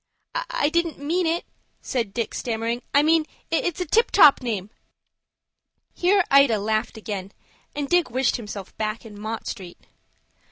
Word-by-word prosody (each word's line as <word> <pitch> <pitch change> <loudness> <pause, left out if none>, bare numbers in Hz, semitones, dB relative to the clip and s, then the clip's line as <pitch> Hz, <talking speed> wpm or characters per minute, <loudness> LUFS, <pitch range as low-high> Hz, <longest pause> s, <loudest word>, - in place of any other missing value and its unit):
"I - - -1
didn't 335 0 0
mean 330 +5 0
it," 335 +2 -1 0.3
said 235 -6 -2
Dick, 230 0 -3
stammering. 230 0 -2
"I 285 - +4
meant 315 0 +3 0.2
it's 335 +1 0
a 360 - -1
tip 450 +9 +3
top 300 -9 +7
name." 215 -5 -3 1.2
Here 380 +2 +3
Ida 275 -5 +6
laughed 215 +2 -1
again, 205 -3 -6 0.4
and 290 -1 -2
Dick 350 0 +2
wished 255 +2 +1
himself 205 -4 -8
back 215 +1 -3
in 210 -2 -11
Mott 220 +1 -4
Street. 185 -5 -7
250 Hz, 150 wpm, -24 LUFS, 215-325 Hz, 1.2 s, top